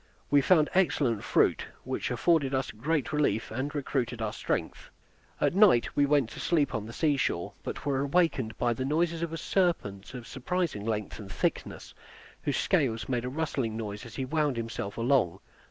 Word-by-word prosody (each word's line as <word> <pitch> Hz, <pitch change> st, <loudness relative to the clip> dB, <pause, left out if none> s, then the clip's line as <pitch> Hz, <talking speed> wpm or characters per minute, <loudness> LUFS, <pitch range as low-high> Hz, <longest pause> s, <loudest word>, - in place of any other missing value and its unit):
We 145 Hz, 0 st, +6 dB
found 155 Hz, 0 st, +4 dB
excellent 140 Hz, -, +2 dB
fruit, -, -, +2 dB, 0.2 s
which -, -, -3 dB
afforded 145 Hz, -6 st, +2 dB
us 130 Hz, 0 st, -1 dB
great 145 Hz, +7 st, -1 dB
relief, 145 Hz, -8 st, +1 dB
and 135 Hz, +6 st, -3 dB
recruited 130 Hz, -4 st, -2 dB
our 110 Hz, -1 st, -2 dB
strength. -, -, -3 dB, 0.5 s
At -, -, +2 dB
night 190 Hz, -, +5 dB
we 145 Hz, 0 st, +3 dB
went 140 Hz, -5 st, +2 dB
to -, -, -9 dB
sleep 155 Hz, -5 st, +1 dB
on 110 Hz, -1 st, -3 dB
the -, -, -7 dB
sea 145 Hz, +3 st, +1 dB
shore; 85 Hz, -9 st, -1 dB
but -, -, -6 dB
were 140 Hz, -2 st, +1 dB
awakened 140 Hz, -6 st, +1 dB
by 120 Hz, -1 st, +1 dB
the 130 Hz, -, -3 dB
noise 165 Hz, +4 st, 0 dB
of 170 Hz, -1 st, -2 dB
a 165 Hz, -, -4 dB
serpent 130 Hz, -, -1 dB
of 120 Hz, -2 st, -7 dB
surprising 140 Hz, -, -2 dB
length 105 Hz, -1 st, -3 dB
and 100 Hz, -2 st, -9 dB
thickness, -, -, -3 dB, 0.5 s
whose -, -, -1 dB
scales 115 Hz, -4 st, +1 dB
made 125 Hz, -2 st, 0 dB
a -, -, -2 dB
rustling 130 Hz, -6 st, -2 dB
noise 105 Hz, -1 st, -5 dB
as 120 Hz, -, -10 dB
he 135 Hz, -, -2 dB
wound 150 Hz, -2 st, 0 dB
himself 115 Hz, -3 st, -4 dB
along. 115 Hz, -7 st, +2 dB
135 Hz, 185 wpm, -29 LUFS, 115-155 Hz, 0.5 s, We